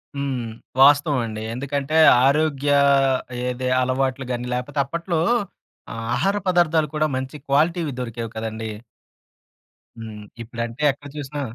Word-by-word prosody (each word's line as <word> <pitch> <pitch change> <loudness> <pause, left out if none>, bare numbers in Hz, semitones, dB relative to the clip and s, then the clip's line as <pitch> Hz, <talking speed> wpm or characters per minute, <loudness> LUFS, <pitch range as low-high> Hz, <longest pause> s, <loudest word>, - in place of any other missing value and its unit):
హ్మ్. 135 -4 -2 0.4
వాస్తవమండి. 135 -6 +4
ఎందుకంటే, 140 +4 -2 0.3
ఆరోగ్యా 145 0 +2 0.7
ఏదే 125 0 -2
అలవాట్లు 130 +1 -1
గానీ, 120 0 -3
లేపోతే 135 +4 -4
అప్పట్లో 170 +3 -2 0.7
ఆహ్, 115 0 -5
ఆహార 195 +12 +1
పదార్థాలు 165 -3 +3
కూడా 155 0 +2
మంచి 130 +2 -4
క్వాలిటీ‌వి 155 +3 +1
దొరికేవి 115 -2 -5
కదండీ! 110 0 -4 1.3
హ్మ్. 110 -2 -8 0.2
ఇప్పుడంటే 115 +3 -6
ఎక్కడ 145 +1 -12
చూసినా 145 0 -5
135 Hz, 110 wpm, -22 LUFS, 120-150 Hz, 1.3 s, వాస్తవమండి